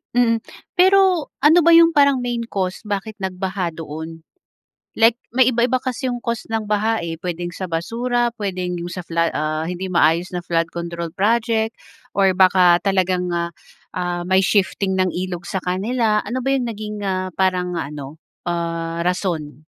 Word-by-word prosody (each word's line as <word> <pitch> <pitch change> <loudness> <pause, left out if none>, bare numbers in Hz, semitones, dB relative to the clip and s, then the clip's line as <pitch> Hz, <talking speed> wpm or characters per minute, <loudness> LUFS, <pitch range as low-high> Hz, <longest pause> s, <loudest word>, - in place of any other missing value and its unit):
Mm, 230 -2 +3 0.4
pero, 375 -3 +5 0.2
ano 315 +4 +7
ba 335 0 +6
'yong 335 0 +7
parang 280 -4 +3
main 240 -1 -2
cause 190 -4 -2
bakit 205 +1 -4
nagbaha 185 -2 -3
doon? 160 +1 -7 0.7
Like, 225 +1 +6 0.2
may 255 +2 +4
iba-iba 240 +2 +2
kasi 255 0 -3
'yong 245 - -2
cause 235 -2 -3
ng 225 -1 -1
baha 215 +2 +1
eh. 165 0 -6
Puwedeng 175 0 -4
sa 185 +1 -5
basura, 235 +8 -1
puwedeng 185 -5 -3
'yong 175 - -5
sa 175 -1 -6
fla 165 0 +1
ah 155 +1 -2
hindi 180 +1 -4
maayos 170 +2 +2
na 180 - -2
flood 165 -1 -1
control 170 -1 -5
project, 225 +2 +1 0.4
or 195 -1 +4
baka 180 -2 +5
talagang 185 -2 +1
ah, 170 0 -2 0.4
ah, 175 -1 -2
may 190 +1 +3
shifting 195 -1 +1
ng 185 -2 +1
ilog 180 -1 -4
sa 190 +1 -3
kanila. 210 +4 0
Ano 245 +5 -3
ba 270 - -1
'yong 270 -2 +1
naging 215 -2 -5
ah 185 -1 -1
parang 180 -2 0
ano, 145 0 -6 0.3
ah, 170 0 -2
rason? 160 -6 -2
185 Hz, 165 wpm, -21 LUFS, 170-230 Hz, 0.7 s, ano